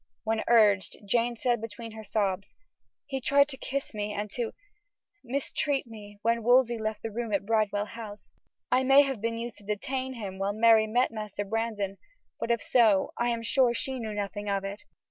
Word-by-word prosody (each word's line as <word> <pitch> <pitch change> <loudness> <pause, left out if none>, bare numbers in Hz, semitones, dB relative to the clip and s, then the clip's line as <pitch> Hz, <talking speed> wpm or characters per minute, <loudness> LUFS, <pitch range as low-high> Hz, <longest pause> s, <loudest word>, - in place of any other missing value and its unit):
When 220 0 0
urged, 210 -5 +4
Jane 235 +3 +1
said 240 -1 0
between 225 +1 -7
her 220 0 -9
sobs: 200 -2 -2 0.5
"He 270 -2 -4
tried 280 +2 +4
to 270 - -3
kiss 275 0 -4
me 210 0 -3
and 205 0 -4
to 235 0 -2 0.7
mistreat 275 +2 -1
me 210 -3 -11
when 230 +1 +2
Wolsey 240 0 +4
left 215 0 -3
the 225 - -3
room 230 +1 -3
at 200 -1 0
Bridewell 210 -2 +1
House. 215 -1 -9 0.4
I 255 - +4
may 270 +2 +7
have 270 -6 -3
been 230 +1 -1
used 230 -1 -6
to - - -17
detain 255 +6 -3
him, 195 -4 -6
while 195 +1 0
Mary 220 0 +5
met 245 +4 +2
Master 210 -2 -5
Brandon, 205 -2 -2 0.4
but - - -3
if 235 -3 +1
so, 215 -5 +3
I 240 0 +2
am 230 -1 -2
sure 240 0 +3
she 265 +2 -2
knew 220 -2 -4
nothing 205 0 -3
of 195 -1 0
it." 200 +8 -6
225 Hz, 190 wpm, -28 LUFS, 205-240 Hz, 0.7 s, may